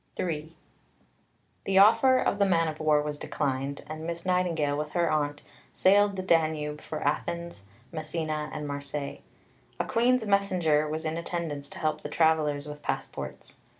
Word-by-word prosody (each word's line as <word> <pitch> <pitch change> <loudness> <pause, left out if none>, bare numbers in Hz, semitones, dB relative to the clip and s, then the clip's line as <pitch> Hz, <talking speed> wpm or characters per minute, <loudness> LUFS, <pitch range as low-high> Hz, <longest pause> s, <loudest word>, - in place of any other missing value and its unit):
III 160 -2 -2 1.1
The 195 -1 +1
offer 230 +6 +7
of 205 - 0
the 200 - +5
man 165 -3 +3
of 155 -1 -4
war 155 -1 +3
was 150 -1 -4
declined; 140 0 -2
and 155 +1 -7
Miss 170 +1 -4
Nightingale, 170 -6 +1
with 150 0 -4
her 175 -1 +2
aunt, 145 -1 -1 0.3
sailed 205 +2 +5
in 200 - -8
the 185 - -3
Danube 155 -4 +1
for 155 - -6
Athens, 170 -1 -2 0.3
Messina, 155 -1 -3
and 150 -1 -5
Marseilles. 140 0 -5 0.6
A - - 0
Queen's 240 0 +2
messenger 180 -7 +2
was 160 +1 -3
in 160 +1 -1
attendance 165 -4 -4
to - - -10
help 155 -2 -1
the - - -6
travellers 155 -3 +2
with 150 0 -8
passports. - - -5
155 Hz, 160 wpm, -28 LUFS, 150-175 Hz, 1.1 s, offer